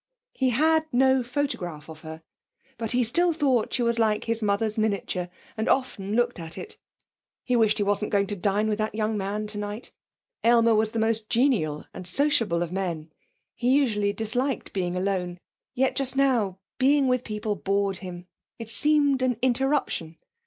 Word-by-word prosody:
He 260 -1 +1
had 315 +5 +2
no 265 +1 +4
photograph 225 - -3
of 160 -1 -11
her, 160 0 -9 0.6
but 225 -2 -1
he 250 0 +3
still 345 +9 +2
thought 265 -7 +1
she 245 - +1
was 235 0 +1
like 215 -1 +2
his 230 0 -2
mother's 210 +1 0
miniature, 200 -4 -1 0.3
and 220 +1 -1
often 210 -6 0
looked 240 -3 +1
at 165 -1 -8
it. 430 - -8 0.6
He 250 - 0
wished 220 -3 +3
he 205 - +1
wasn't 205 +1 0
going 200 -1 +2
to 205 - -4
dine 200 +3 0
with 215 0 -1
that 215 0 -2
young 215 0 0
man 205 +1 -2
tonight. 210 +1 -5 0.5
Aylmer 230 -1 +5
was 220 0 +2
the 230 - -5
most 225 -1 +1
genial 210 - +1
and 180 - -8
sociable 230 - +2
of 170 - -6
men; 170 -5 -3 0.4
he 250 +3 +2
usually 210 -7 +1
disliked 225 +5 -2
being 180 -2 -1
alone; 180 -2 -1 0.4
yet 265 +1 +1
just 270 -2 -1
now 240 -9 +2 0.2
being 275 +1 +4
with 250 -1 +1
people 210 -1 -3
bored 195 0 0
him; 180 -1 -8 0.3
it 225 -1 -8
seemed 285 +3 +2
an 255 -3 +1
interruption. 260 - 0
220 Hz, 175 wpm, -26 LUFS, 195-255 Hz, 0.6 s, Aylmer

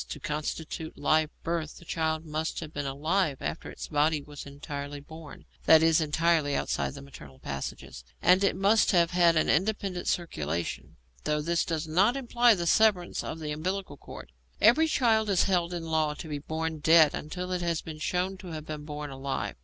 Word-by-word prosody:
To 150 - -6
constitute 155 +2 -4
'live 155 +2 +2
birth,' 165 -2 -3
the 170 - -14
child 160 0 -1
must 155 +1 -3
have 155 0 -8
been 145 - -3
alive 155 +2 0
after 75 - -5
its - - -7
body 150 +1 +2
was 145 -1 -10
entirely 145 0 -6
born 155 +1 -12 0.2
that 160 0 +7
is, 165 0 +4
entirely 155 -1 +1
outside - - -1
the 140 - -9
maternal 75 - -13
passages 70 -2 -6 0.2
and 185 +2 +4
it 195 - +2
must 205 +3 +3
have 170 -1 +4
had 175 -2 +4
an 155 - +2
independent 190 0 0
circulation, 85 - -3 0.3
though 150 0 +1
this 170 +3 0
does 160 -1 -3
not 195 +11 +3
imply 240 -3 +3
the 175 -2 -3
severance 190 -1 +2
of - - -5
the 155 -1 -4
umbilical 180 +1 -3
cord. 105 - -11 0.3
Every 275 +9 +5
child 225 -7 +2
is 195 -3 +3
held 175 -2 +1
in 170 -2 -4
law 155 -2 0
to 160 - -8
be 150 -2 -4
born 160 +1 -3
dead 160 0 +6
until 180 +4 -5
it 180 -1 -1
has 170 -2 -1
been 155 -1 -8
shown 180 +4 -1
to 185 - -11
have 155 -1 -6
been 150 -1 -6
born 150 -1 -6
alive. 135 0 -4
160 Hz, 190 wpm, -28 LUFS, 150-180 Hz, 0.3 s, that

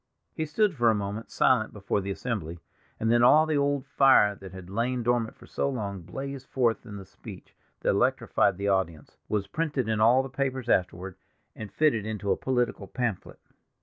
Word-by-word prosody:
He 160 - -3
stood 200 +6 +1
for 120 -5 +3
a 110 - +3
moment 105 +2 -4
silent 125 -4 +2
before 100 0 -2
the 95 - -5
assembly, 95 -6 -4 0.4
and 110 +1 +1
then 120 0 +4
all 150 +6 +6
the 155 -1 -1
old 140 -1 0
fire 135 -7 +5
that 95 -2 -11
had 95 -2 -10
lain 120 +5 -1
dormant 120 -1 0
for - - -16
so - - -2
long 100 -7 -4
blazed 135 +8 -7
forth 120 -2 0
in 105 - -8
the 95 - -9
speech - - -13 0.3
that - - 0
electrified 95 - +2
the 100 +1 -2
audience, 95 -6 -1
was 105 -2 0
printed 145 +2 -2
in 110 -1 0
all 120 +4 +5
the - - -5
papers 130 -2 -3
afterward, 90 0 0 0.4
and 110 -3 -8
fitted 140 -5 +2
into 105 -2 -3
a - - +3
political 125 -6 -1
pamphlet. 115 -1 -3
115 Hz, 190 wpm, -27 LUFS, 100-130 Hz, 0.4 s, all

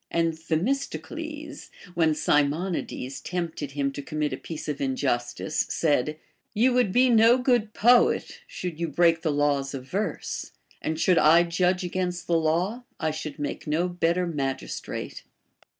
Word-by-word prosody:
And 165 -1 +1
Themistocles, 280 - -3 0.2
when 160 -3 +2
74 150 +6 +1
BASHFULNESS. 135 -5 -5
Sinionides - - -27
tempted 165 -5 -4
him 140 -1 0
to 145 - -6
commit 150 0 -2
a - - -3
piece 160 -2 -7
of 150 -2 -3
injustice, 130 +1 -1
said: 150 -1 +1 0.4
You 245 +4 +4
would 245 -6 +2
be 255 +5 +4
no 230 0 +6
good 245 -4 +1
poet, 240 +2 +3
should 175 -3 -6
you 170 - -1
break 165 +1 +3
the 160 - 0
laws 145 -1 0
of 130 -1 -8
verse; 195 -2 -3 0.3
and 160 0 -2
should 180 0 +4
I 165 +3 +6
judge 180 +2 +1
against 180 0 -2
the 170 - +1
law, 170 +9 0 0.2
I 160 -2 0
should 155 -1 -6
make 145 - -5
no 160 +4 +1
better 175 0 0
magistrate. 135 -5 -4
165 Hz, 155 wpm, -26 LUFS, 150-185 Hz, 0.4 s, no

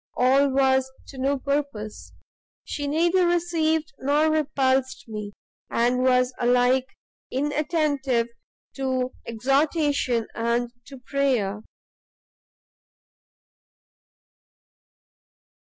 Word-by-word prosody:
all 270 +3 +4
was 265 -1 +2
to - - -12
no 275 +2 +1
purpose; 275 -6 -3 0.5
she 290 -1 -4
neither 345 +4 +2
received 320 -3 0
nor 295 +3 +2
repulsed 270 -4 0
me, 210 -2 -6 0.4
and 245 +2 +1
was 255 0 +3
alike 250 +1 +3 0.4
inattentive 285 -3 0 0.5
to 260 -2 -1 0.2
exhortation 270 0 +1
and 235 +1 -1 0.2
to 275 - -10
prayer. 245 -8 0
265 Hz, 75 wpm, -24 LUFS, 250-295 Hz, 0.5 s, all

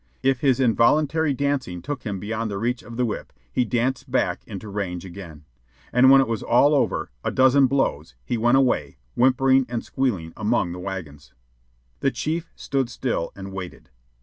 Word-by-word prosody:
If 135 -1 +2
his 135 -2 +2
involuntary 145 +6 +3
dancing 135 -11 -2
took 145 -1 -4
him 100 -2 -3
beyond 110 +3 -3
the 100 - -4
reach 120 +4 -1
of 115 +1 -10
the 125 - +2
whip, 110 - -5 0.2
he 125 - +2
danced 125 +3 -1
back - - 0
into 100 +2 -7
range 95 -3 -4
again. 85 -5 -10 0.5
And 125 +2 +6
when 135 0 +8
it 135 - 0
was 115 -2 -2
all 130 +5 +4
over 80 - 0
a - - 0
dozen 130 +1 +4
blows 80 - -1
he - - -1
went 120 +3 +3
away, 130 -2 +1 0.2
whimpering 130 +1 +4
and 120 -2 -3
squealing, 95 -12 -2
among 105 -5 0
the 90 - -7
wagons. 85 -8 -7 0.6
The 135 - +2
chief 160 +5 -3
stood 135 -3 -2
still 120 -8 -2
and 95 0 -8
waited. 90 -7 -8
120 Hz, 175 wpm, -23 LUFS, 95-135 Hz, 0.6 s, when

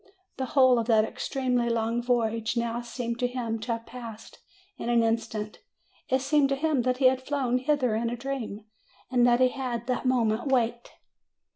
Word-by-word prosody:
The 265 - -2
whole 260 -2 +6
of 230 - -2
that 220 -2 +4
ex 240 +3 -6
tremely 250 -3 0
long 230 +1 0
voyage 230 -1 0
now 235 0 -1
seemed 235 0 -5
to 245 - +2
him 240 -3 -3
to 230 +2 -2
have 230 0 -6
passed 230 -3 -10 0.4
in - - -3
an 235 -1 +4
instant. 225 -2 -2 0.5
It 260 0 +2
seemed 280 0 +3
to 275 - +1
him 295 -2 +1
that 250 +1 0
he 265 - +1
had 260 0 +4
flown 260 -3 0
hither 260 -3 +1
in 230 +2 0
a 240 - -4
dream, 235 -5 -5 0.5
and 245 -1 +4
that 240 0 +4
he 255 0 +5
had 250 -3 -4
that 255 +1 -1
moment 240 0 +1
waked. 240 -2 0
240 Hz, 190 wpm, -27 LUFS, 230-255 Hz, 0.5 s, whole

